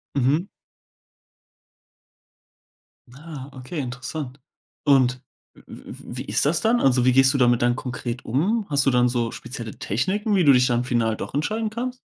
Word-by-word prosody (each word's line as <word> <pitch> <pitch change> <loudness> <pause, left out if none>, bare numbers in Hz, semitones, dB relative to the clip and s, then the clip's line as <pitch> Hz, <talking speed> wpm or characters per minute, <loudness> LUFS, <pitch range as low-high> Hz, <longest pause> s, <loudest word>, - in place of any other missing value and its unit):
Mhm. 140 +7 +1 2.7
Ah, 145 -1 -9
okay, 130 +5 -7
interessant. 130 +1 -5 0.5
Und 130 -2 +3 0.3
w - - -19
w - - -11 0.2
w - - -7
wie - - -5
ist - - 0
das 155 +3 +2
dann? 235 +2 +2
Also, 125 -2 +3
wie 130 - +4
gehst 135 +1 +5
du - - +1
damit 120 -2 +3
dann 120 0 +2
konkret 125 -1 -5
um? 195 - 0
Hast 140 -2 +1
du - - +5
dann 125 0 +3
so 120 -2 -1
spezielle 115 -4 -8
Techniken, 200 - -1
wie 185 - +3
du 145 - +7
dich 125 -1 +4
dann 120 0 +1
final 115 -3 0
doch - - -7
entscheiden 215 +10 -1
kannst? 250 +3 -4
130 Hz, 170 wpm, -23 LUFS, 125-160 Hz, 2.7 s, du